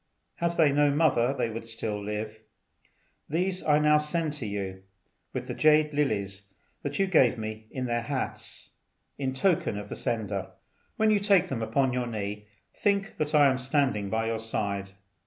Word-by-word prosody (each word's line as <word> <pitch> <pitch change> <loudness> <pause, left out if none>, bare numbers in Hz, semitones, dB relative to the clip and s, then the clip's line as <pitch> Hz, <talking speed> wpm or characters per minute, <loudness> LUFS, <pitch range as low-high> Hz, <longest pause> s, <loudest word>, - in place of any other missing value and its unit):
Had 170 0 0
they 155 -4 +5
no 145 +1 +4
mother 140 -5 +3
they 120 -4 -1
would 115 +1 -6
still 110 -2 -4
live. 105 +1 -4 0.9
These 180 +4 0
I 150 -1 +4
now 150 0 +5
send 150 0 -1
to 140 -7 -5
you, 95 -2 -4 0.5
with - - -4
the - - -3
jade 155 0 +4
lilies 100 -8 -1 0.3
you 145 +7 0
gave 145 -11 +4
me 110 0 -6
in 130 -1 -4
their 120 -1 0
hats, 130 +3 -4 0.5
in 135 -2 -1
token 155 - +1
of 105 0 -7
the - - -5
sender. 100 -4 -3 0.4
When 220 0 +3
you 210 - +4
take 195 -3 +3
them 125 -4 -2
upon 125 +4 +1
your 125 -1 -1
knee, 105 -2 -4 0.3
think 200 0 0
that 150 0 -1
I 145 -1 +7
am 130 -1 +1
standing 130 -6 +1
by 110 +2 0
your 115 0 -1
side. 100 -3 -2
130 Hz, 175 wpm, -28 LUFS, 110-150 Hz, 0.9 s, I